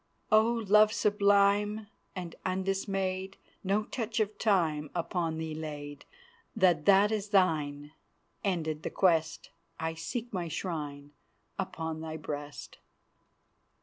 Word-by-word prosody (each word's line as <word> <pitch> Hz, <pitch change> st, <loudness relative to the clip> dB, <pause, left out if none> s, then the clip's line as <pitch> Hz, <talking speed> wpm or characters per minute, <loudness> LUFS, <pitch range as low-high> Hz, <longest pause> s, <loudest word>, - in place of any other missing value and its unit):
"O 215 Hz, 0 st, +8 dB, 0.3 s
Love 210 Hz, +1 st, +6 dB
sublime 205 Hz, 0 st, +3 dB, 0.3 s
And 180 Hz, -3 st, -5 dB
undismayed, 190 Hz, 0 st, -2 dB, 0.3 s
No 200 Hz, +2 st, +1 dB
touch 225 Hz, 0 st, -3 dB
of 215 Hz, -1 st, 0 dB
Time 160 Hz, -8 st, +1 dB
Upon 170 Hz, -1 st, -1 dB
thee 160 Hz, -1 st, -4 dB
laid. 145 Hz, -2 st, -7 dB, 0.5 s
Take 175 Hz, -5 st, +4 dB
that 200 Hz, +1 st, +6 dB
is 210 Hz, -1 st, -2 dB
thine; 150 Hz, -7 st, +1 dB, 0.5 s
Ended 160 Hz, -6 st, -1 dB
the -, -, -3 dB
quest! 165 Hz, -4 st, +1 dB, 0.3 s
I 160 Hz, 0 st, -2 dB
seek 230 Hz, +9 st, -5 dB
my 180 Hz, -3 st, -2 dB
shrine 145 Hz, -4 st, -5 dB, 0.5 s
Upon 160 Hz, -4 st, -3 dB
thy 160 Hz, 0 st, -5 dB
breast." 145 Hz, -1 st, -7 dB
185 Hz, 115 wpm, -30 LUFS, 160-200 Hz, 0.5 s, O